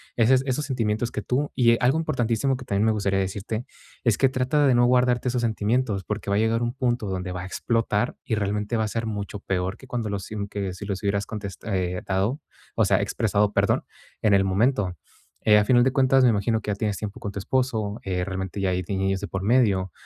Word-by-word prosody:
ese 120 Hz, +3 st, +5 dB
esos 135 Hz, +3 st, -1 dB
sentimientos 115 Hz, -3 st, -1 dB
que -, -, -3 dB
tú 140 Hz, +4 st, -1 dB
y, 115 Hz, -2 st, +4 dB
eh, -, -, +2 dB
algo 135 Hz, +6 st, +3 dB
importantísimo 130 Hz, -3 st, 0 dB
que 125 Hz, -, -10 dB
también 100 Hz, -2 st, +1 dB
me 110 Hz, -, +4 dB
gustaría 100 Hz, -2 st, 0 dB
decirte 100 Hz, +4 st, -3 dB, 0.4 s
es 115 Hz, -5 st, +2 dB
que 135 Hz, -, +4 dB
trata 130 Hz, +3 st, +1 dB
de 130 Hz, -, +4 dB
no 120 Hz, 0 st, +4 dB
guardarte 125 Hz, 0 st, +2 dB
esos 125 Hz, 0 st, 0 dB
sentimientos, 110 Hz, -1 st, 0 dB
porque 105 Hz, +2 st, -4 dB
va 100 Hz, -, +2 dB
a -, -, +2 dB
llegar 115 Hz, +1 st, +1 dB
un 120 Hz, +1 st, -1 dB
punto 125 Hz, -5 st, -1 dB
donde 95 Hz, -1 st, -3 dB
va 90 Hz, -, -4 dB
a -, -, -6 dB
explotar 115 Hz, +3 st, -1 dB
y -, -, -3 dB
realmente 105 Hz, +2 st, -1 dB
va 110 Hz, -, +1 dB
a -, -, -2 dB
ser 115 Hz, +2 st, -3 dB
mucho 105 Hz, -1 st, -4 dB
peor 95 Hz, -1 st, -2 dB
que 130 Hz, -, -14 dB
cuando 120 Hz, -3 st, -3 dB
los 100 Hz, -2 st, -3 dB
si 110 Hz, -, -8 dB
que 100 Hz, -3 st, -3 dB
si 100 Hz, +3 st, -8 dB
los 100 Hz, 0 st, -4 dB
hubieras 100 Hz, 0 st, 0 dB
contes 100 Hz, -4 st, -6 dB
eh, 90 Hz, -3 st, -2 dB
...tado, 100 Hz, +9 st, 0 dB, 0.3 s
o -, -, +3 dB
sea, -, -, +3 dB
expresado, 105 Hz, -1 st, +1 dB
perdón, -, -, +2 dB, 0.4 s
en 105 Hz, -, +3 dB
el 95 Hz, 0 st, +5 dB
momento. 100 Hz, -1 st, +1 dB, 0.5 s
Eh, 105 Hz, -1 st, +7 dB
a 105 Hz, -, +3 dB
final 120 Hz, +1 st, +5 dB
de 130 Hz, -, +3 dB
cuentas, 135 Hz, -1 st, +4 dB
me 125 Hz, -, +6 dB
imagino 110 Hz, +1 st, +1 dB
que 105 Hz, -, -3 dB
ya -, -, -1 dB
tienes 105 Hz, -1 st, -2 dB
tiempo 105 Hz, -2 st, -6 dB
con 100 Hz, -, -5 dB
tu -, -, -7 dB
esposo, 110 Hz, -2 st, -1 dB
eh, 90 Hz, -2 st, -1 dB
realmente 95 Hz, +1 st, -4 dB
ya 95 Hz, -, +1 dB
hay 90 Hz, 0 st, 0 dB
niños 95 Hz, 0 st, 0 dB
de 100 Hz, -, -5 dB
por 95 Hz, 0 st, -4 dB
medio, 100 Hz, -6 st, +2 dB
105 Hz, 235 wpm, -25 LUFS, 100-125 Hz, 0.5 s, Eh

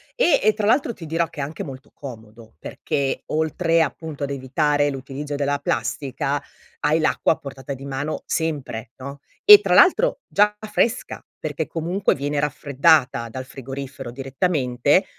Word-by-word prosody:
E 350 Hz, -, +3 dB
e 215 Hz, -, +5 dB
tra 210 Hz, -1 st, -2 dB
l'altro 250 Hz, +2 st, +3 dB
ti 175 Hz, -, -10 dB
dirò 165 Hz, +2 st, 0 dB
che 160 Hz, -, -11 dB
è -, -, 0 dB
anche 150 Hz, +3 st, -5 dB
molto 135 Hz, -2 st, -10 dB
comodo, 110 Hz, -, -11 dB
perché 140 Hz, -2 st, -3 dB
oltre 165 Hz, +2 st, +1 dB
appunto 160 Hz, -2 st, -3 dB
ad 140 Hz, -, -2 dB
evitare 145 Hz, +2 st, +1 dB
l'utilizzo 140 Hz, +2 st, -5 dB
della 145 Hz, 0 st, 0 dB
plastica, 140 Hz, 0 st, -2 dB, 0.4 s
hai 150 Hz, +2 st, +2 dB
l'acqua 155 Hz, -, +2 dB
a -, -, -12 dB
portata 140 Hz, 0 st, -7 dB
di 135 Hz, +1 st, -9 dB
mano 140 Hz, +3 st, -4 dB
sempre, 140 Hz, -8 st, -3 dB
no 140 Hz, +2 st, -8 dB, 0.2 s
e 415 Hz, -1 st, +11 dB
tra -, -, +1 dB
l'altro -, -, +5 dB
già 210 Hz, +1 st, +3 dB
fresca 230 Hz, +3 st, -1 dB
perché -, -, -3 dB
comunque 175 Hz, +4 st, 0 dB
viene 145 Hz, +1 st, -3 dB
raffreddata 140 Hz, -3 st, +2 dB
dal 130 Hz, +3 st, -6 dB
frigorifero 135 Hz, 0 st, -7 dB
direttamente, 135 Hz, -, +1 dB
145 Hz, 155 wpm, -22 LUFS, 135-165 Hz, 0.4 s, e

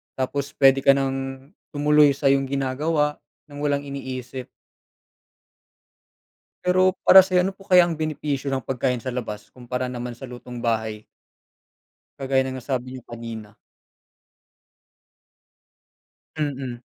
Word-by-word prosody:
tapos 140 Hz, +2 st, -3 dB
puwede 135 Hz, -1 st, +5 dB
ka 135 Hz, 0 st, +5 dB
nang 135 Hz, +1 st, -3 dB, 0.2 s
tumuloy 150 Hz, -1 st, +5 dB
sa'yong 135 Hz, -1 st, +2 dB
ginagawa 145 Hz, +3 st, 0 dB, 0.3 s
ng 145 Hz, -, -9 dB
walang 145 Hz, -1 st, 0 dB
iniisip. 130 Hz, -2 st, -6 dB, 2.2 s
Pero 185 Hz, +1 st, +3 dB
para 190 Hz, -, +10 dB
sa'yo, 185 Hz, -1 st, +4 dB
ano 190 Hz, -, 0 dB
po 195 Hz, +1 st, -18 dB
kaya 180 Hz, -2 st, +7 dB
ang 170 Hz, -, -1 dB
benepisyo 150 Hz, -3 st, -2 dB
ng 135 Hz, -2 st, -1 dB
pagkain 125 Hz, -1 st, -1 dB
sa 130 Hz, -, -3 dB
labas 110 Hz, -4 st, -6 dB
kumpara 125 Hz, 0 st, -4 dB
naman 120 Hz, -1 st, -5 dB
sa 120 Hz, -, -14 dB
lutong 125 Hz, -1 st, -8 dB
bahay? 110 Hz, -2 st, -1 dB, 1.2 s
Kagaya 135 Hz, -1 st, +1 dB
ng 130 Hz, 0 st, -4 dB
nasabi 130 Hz, -1 st, -2 dB
niyo 130 Hz, -, -8 dB
kanina? 115 Hz, -3 st, -8 dB, 2.8 s
Mm. 135 Hz, -5 st, -3 dB
135 Hz, 115 wpm, -23 LUFS, 125-145 Hz, 2.8 s, para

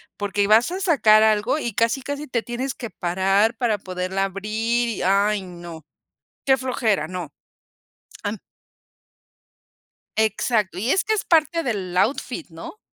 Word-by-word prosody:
porque 205 Hz, 0 st, -1 dB
vas 225 Hz, +8 st, +4 dB
a 370 Hz, -, -3 dB
sacar 225 Hz, -, +5 dB
algo 220 Hz, +6 st, +2 dB
y 235 Hz, -6 st, -3 dB
casi, 230 Hz, +5 st, +1 dB
casi 285 Hz, +2 st, -5 dB
te 240 Hz, -2 st, -1 dB
tienes 245 Hz, +3 st, -4 dB
que 235 Hz, -, -7 dB
parar 195 Hz, +6 st, +1 dB
para 225 Hz, -4 st, 0 dB
poderla 185 Hz, +1 st, -3 dB
abrir 215 Hz, +5 st, -1 dB
y, 225 Hz, -4 st, -3 dB
ay, 200 Hz, +2 st, +2 dB
no, 170 Hz, -4 st, -10 dB, 0.6 s
qué 265 Hz, -1 st, +4 dB
flojera, 235 Hz, -, 0 dB
no, 175 Hz, -5 st, -6 dB, 0.9 s
am 205 Hz, +1 st, -2 dB, 1.8 s
Exacto, 220 Hz, -2 st, 0 dB
y 225 Hz, +6 st, -1 dB
es 380 Hz, -, +2 dB
que 435 Hz, -, 0 dB
es 430 Hz, -, -1 dB
parte 330 Hz, 0 st, +2 dB
del 195 Hz, -, -3 dB
outfit, 255 Hz, -, 0 dB
¿no? 165 Hz, -, -10 dB
215 Hz, 145 wpm, -22 LUFS, 195-250 Hz, 1.8 s, sacar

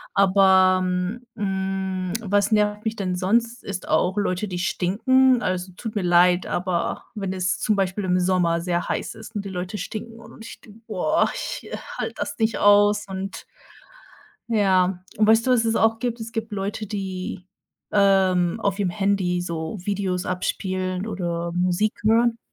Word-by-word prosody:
Aber, 190 Hz, -1 st, +5 dB
m 180 Hz, +6 st, -2 dB
hm, 190 Hz, -2 st, -2 dB
was 205 Hz, 0 st, +1 dB
nervt 210 Hz, 0 st, +1 dB
mich 220 Hz, 0 st, -1 dB
denn 185 Hz, -3 st, -2 dB
sonst, 230 Hz, +6 st, 0 dB
ist 195 Hz, -2 st, -6 dB
auch 185 Hz, +3 st, +1 dB
Leute, 205 Hz, 0 st, 0 dB
die 180 Hz, -2 st, -4 dB
stinken. 245 Hz, +8 st, +2 dB
Also, 185 Hz, 0 st, -2 dB
tut 225 Hz, -2 st, -6 dB
mir 205 Hz, -, 0 dB
leid, 175 Hz, +1 st, +4 dB
aber 175 Hz, -1 st, -2 dB
wenn 195 Hz, -3 st, -3 dB
es 185 Hz, 0 st, -1 dB
zum 215 Hz, -, +1 dB
Beispiel 195 Hz, 0 st, -1 dB
im 180 Hz, 0 st, +2 dB
Sommer 180 Hz, -2 st, +1 dB
sehr 175 Hz, 0 st, -1 dB
heiß -, -, -2 dB
ist 220 Hz, 0 st, -12 dB
und 205 Hz, -1 st, -3 dB
die -, -, -5 dB
Leute 180 Hz, +2 st, -4 dB
stinken 225 Hz, +2 st, -6 dB
und 225 Hz, 0 st, -13 dB
ich -, -, -10 dB
denke, 215 Hz, 0 st, -16 dB
boah, 235 Hz, -, +1 dB
ich, -, -, -5 dB
äh, -, -, -3 dB, 0.2 s
halte -, -, -3 dB
das -, -, -4 dB
nicht 220 Hz, 0 st, +1 dB
aus. 205 Hz, 0 st, +5 dB
Und 190 Hz, 0 st, -6 dB, 1.0 s
ja, 190 Hz, -4 st, +2 dB, 0.2 s
weißt 220 Hz, +2 st, +4 dB
du, -, -, +5 dB
was 235 Hz, -2 st, +3 dB
es 225 Hz, 0 st, +1 dB
auch 225 Hz, 0 st, +3 dB
gibt? 240 Hz, -1 st, -2 dB
Es 225 Hz, +1 st, -7 dB
gibt 225 Hz, -1 st, -4 dB
Leute, 205 Hz, +2 st, -3 dB
die, 190 Hz, -2 st, -5 dB, 0.5 s
ähm, 190 Hz, -2 st, +3 dB
auf 200 Hz, -2 st, -1 dB
ihrem 195 Hz, -3 st, 0 dB
Handy 190 Hz, -2 st, 0 dB
so 170 Hz, +2 st, -4 dB
Videos 190 Hz, -3 st, -2 dB
abspielen 185 Hz, +1 st, -2 dB
oder 170 Hz, -4 st, -3 dB
Musik 180 Hz, +4 st, +1 dB
hören. 230 Hz, +2 st, +3 dB
195 Hz, 170 wpm, -23 LUFS, 185-215 Hz, 1.0 s, Aber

